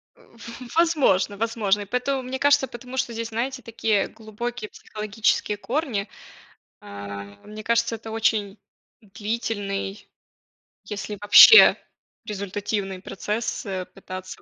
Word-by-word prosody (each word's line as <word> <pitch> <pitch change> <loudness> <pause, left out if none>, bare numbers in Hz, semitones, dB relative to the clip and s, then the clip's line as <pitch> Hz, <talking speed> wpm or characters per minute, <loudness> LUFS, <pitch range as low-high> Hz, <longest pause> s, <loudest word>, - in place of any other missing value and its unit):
Э, - - -23
в - - -20 0.2
в 250 +3 -10
возможно 275 - +3
возможно. 210 -2 0
Поэтому, 250 +4 -1
мне 255 +1 -5
кажется, 285 -1 +4
потому 250 +2 -9
что 245 -2 -1
здесь, 230 0 -4
знаете, 255 +3 -3
такие 225 -3 0
глубокие 225 +1 -6
психологические 210 0 -1
корни. 230 -3 -2 0.7
А, 100 0 -8 0.2
мне 215 +1 -9
кажется, 235 0 +1
это 225 0 -9
очень 215 -2 0 0.4
длительный, 205 -1 -4 0.8
если 205 0 -6
вообще 325 - +9 0.5
результативный 200 -2 -4
процесс, 210 +4 -4
э, 190 -2 -4
пытаться 185 -1 -9
215 Hz, 115 wpm, -24 LUFS, 200-235 Hz, 0.8 s, вообще